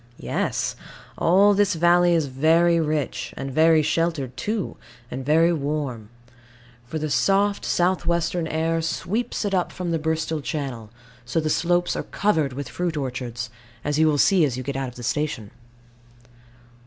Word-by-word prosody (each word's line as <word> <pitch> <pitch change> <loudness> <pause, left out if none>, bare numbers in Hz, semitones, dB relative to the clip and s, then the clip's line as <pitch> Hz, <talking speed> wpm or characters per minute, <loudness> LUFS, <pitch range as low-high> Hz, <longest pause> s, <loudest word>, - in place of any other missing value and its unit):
Yes. - - -2 0.4
All 195 +4 +4
this 200 -2 +2
valley 175 +1 +4
is 160 -3 +2
very 165 +5 +3
rich, 155 -3 -2
and 135 0 -4
very 160 +2 +4
sheltered 155 -4 -1
too, 210 - -3 0.4
and 130 +1 -4
very 165 +5 +4
warm; 140 -7 -3 0.8
for 160 - -4
the 155 0 -2
soft 195 +10 +2
south 180 +1 +1
western 170 0 0
air 165 +1 0
sweeps 215 +8 -2
up 190 -3 0
it - - -15
from 180 -2 -3
the 165 - 0
Bristol 160 0 -1
Channel; 135 -7 -4 0.3
so 120 +7 -1
the 155 -1 -1
slopes 175 +1 +1
are - - -1
covered 160 -10 0
with 140 0 -5
fruit 175 +2 -3
orchards, 125 -4 -4 0.3
as 145 +1 -1
you 160 - +5
will 150 -1 +2
see 185 +3 +4
as 130 -4 0
you 130 - -4
get 140 +2 -4
out 135 -1 -2
of 125 - -10
the 120 - -9
station. 130 -5 -2
160 Hz, 165 wpm, -23 LUFS, 135-175 Hz, 0.8 s, you